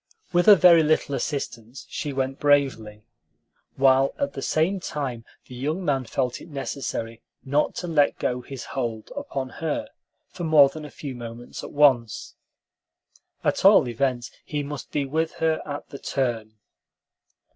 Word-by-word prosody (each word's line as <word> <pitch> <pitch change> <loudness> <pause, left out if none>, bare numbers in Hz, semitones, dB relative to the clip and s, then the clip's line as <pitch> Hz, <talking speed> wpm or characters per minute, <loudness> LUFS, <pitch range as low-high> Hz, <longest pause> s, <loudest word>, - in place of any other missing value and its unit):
With 175 +2 +3
a 210 - +11
very 175 -3 +7
little 155 -2 +1
assistance 130 -4 -4
she 145 - -4
went 135 0 -2
bravely, 130 -8 +1 0.7
while 135 0 +4
at 280 - -2
the - - -6
same 175 +5 +1
time 135 -9 -4 0.2
the - - -12
young 150 +9 -3
man 135 -4 0
felt 125 +1 -2
it - - -12
necessary 135 -5 -4 0.2
not 145 +3 +1
to 175 - -4
let 150 -4 +2
go 125 0 -1
his 130 0 -8
hold 115 -5 -3
upon 140 - -4
her 160 -2 -2 0.4
for - - -8
more 155 -4 +6
than 155 +2 -8
a - - -8
few 140 -2 -7
moments 120 0 -8
at - - -8
once. 130 -6 +2 1.1
At - - 0
all - - +7
events, 120 0 -1
he 145 -1 -3
must 145 0 -7
be 145 -2 0
with 160 +4 -1
her 160 -1 0
at 145 0 -6
the 140 - -9
turn. 115 -5 -2
140 Hz, 155 wpm, -25 LUFS, 125-150 Hz, 1.1 s, a